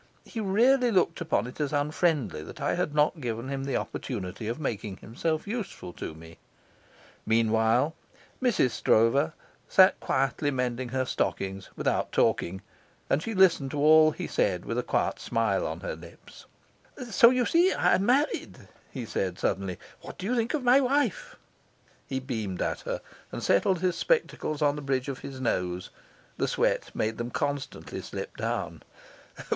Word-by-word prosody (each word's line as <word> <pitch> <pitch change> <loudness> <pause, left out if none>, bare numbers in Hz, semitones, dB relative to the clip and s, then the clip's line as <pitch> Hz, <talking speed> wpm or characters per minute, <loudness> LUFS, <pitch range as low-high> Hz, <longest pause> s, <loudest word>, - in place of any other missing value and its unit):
He 230 - -6
really 240 +6 +3
looked 180 -3 +2
upon 165 - 0
it 125 +5 -7
as 145 - -1
unfriendly 145 - 0
that - - -10
I - - 0
had 150 - -1
not 150 +1 +2
given 120 +1 -3
him 135 -1 -3
the 135 -2 -2
opportunity 105 -3 -5
of 115 +6 -3
making 105 -8 -3
himself 155 +10 -3
useful 205 - -5
to 80 - -6
me. 80 +1 -13 0.8
Meanwhile, 115 +5 +2 0.5
Mrs. 240 - +2
Stroeve 135 +11 +3 0.4
sat 190 0 +6
quietly 135 +2 0
mending 125 -2 -2
her 130 +1 -1
stockings, 95 -5 -2
without - - 0
talking, 95 +2 +1 0.5
and 140 - +3
she 225 +3 -4
listened 175 -8 +4
to 145 - -5
all 155 +1 +7
he - - -5
said - - 0
with - - -2
a - - +2
quiet - - -1
smile - - 0
on - - -5
her - - -4
lips. - - -14 0.6
"So, 235 -1 +7
you 250 -1 +2
see, 350 +7 +4
I'm 190 - +3
married," 270 +7 +1 0.3
he 125 -4 -6
said 95 -4 -2
suddenly; 95 -2 -1 0.2
"what - - -10
do 185 - -6
you 245 +5 0
think 235 +4 0
of 290 - -3
my 250 +2 +6
wife?" 270 - 0 0.7
He 130 - -2
beamed 110 -8 -3
at - - -2
her, - - -2 0.3
and - - -5
settled 175 - +2
his 180 -2 +1
spectacles 160 - 0
on 145 0 +3
the 150 - -5
bridge 135 -1 -1
of 135 - -5
his 135 -1 -8
nose. 90 -7 -2 0.5
The - - 0
sweat - - 0
made 110 +1 -1
them 120 0 -3
constantly 145 +2 -3
slip - - -7
down. - - -3
140 Hz, 165 wpm, -28 LUFS, 115-190 Hz, 0.8 s, all